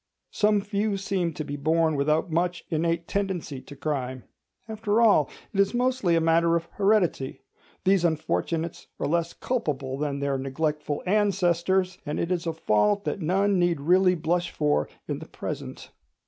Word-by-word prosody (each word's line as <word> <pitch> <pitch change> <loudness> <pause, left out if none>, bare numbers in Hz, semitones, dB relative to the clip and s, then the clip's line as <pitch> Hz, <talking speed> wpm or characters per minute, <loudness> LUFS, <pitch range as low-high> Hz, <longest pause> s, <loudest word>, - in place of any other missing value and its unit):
Some 210 -1 +2
few 205 0 -1
seem 190 -3 -1
to 155 - -4
be 145 -1 -5
born 160 +2 +2
without 155 +4 +1
much 175 +1 0
innate 165 +1 0
tendency 185 -9 -2
to 145 - -12
crime. 130 -3 -3 0.4
After 220 0 0
all, 205 - +5 0.2
it 200 - -2
is 200 +3 +3
mostly 245 -8 +2
a - - +4
matter 165 +1 +3
of 170 0 -1
heredity; 195 -10 +1 0.4
these 190 -1 +3
unfortunates 165 0 -1
are - - -1
less 170 +2 0
culpable 140 - -2
than 145 -2 -1
their 140 -1 -1
neglectful 150 +2 -2
ancestors; 185 -2 +1
and 150 -2 -3
it 170 - -1
is 175 -2 -1
a 165 - 0
fault 165 - +2
that 195 - -3
none 195 +4 +2
need 175 -3 +2
really 180 +5 +4
blush 170 +2 0
for 150 -1 0 0.2
in - - -3
the - - -10
present. - - -6
170 Hz, 160 wpm, -26 LUFS, 155-195 Hz, 0.4 s, all